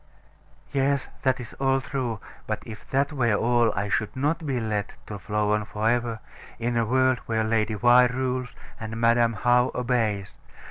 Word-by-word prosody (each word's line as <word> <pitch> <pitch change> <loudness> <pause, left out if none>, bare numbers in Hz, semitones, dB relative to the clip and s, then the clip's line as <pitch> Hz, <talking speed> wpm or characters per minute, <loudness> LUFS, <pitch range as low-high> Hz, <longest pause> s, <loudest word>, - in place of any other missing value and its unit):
'" - - -31
Yes. 140 0 +1
That 130 0 +1
is 120 - -8
all 135 0 +2
true: 130 -4 -3 0.3
but - - -3
if 110 -1 -10
that 140 +3 +1
were 120 -6 +2
all, 120 +1 +3
I 100 +2 -1
should 105 +3 -1
not 150 +4 -1
be 130 -3 0
let 105 -2 -2
to 105 -2 -7
flow 105 +4 -1
on 105 0 +1
for 105 +1 -2
ever, 115 -1 0 0.4
in 120 +1 -2
a 115 -1 +1
world 130 +1 +3
where 110 -1 +1
Lady 110 -1 0
Why 120 +3 +6
rules, 125 0 -3 0.2
and 110 0 -5
Madam 115 0 +3
How 125 +3 +3
obeys. 115 -6 -1
120 Hz, 180 wpm, -25 LUFS, 110-130 Hz, 0.4 s, Why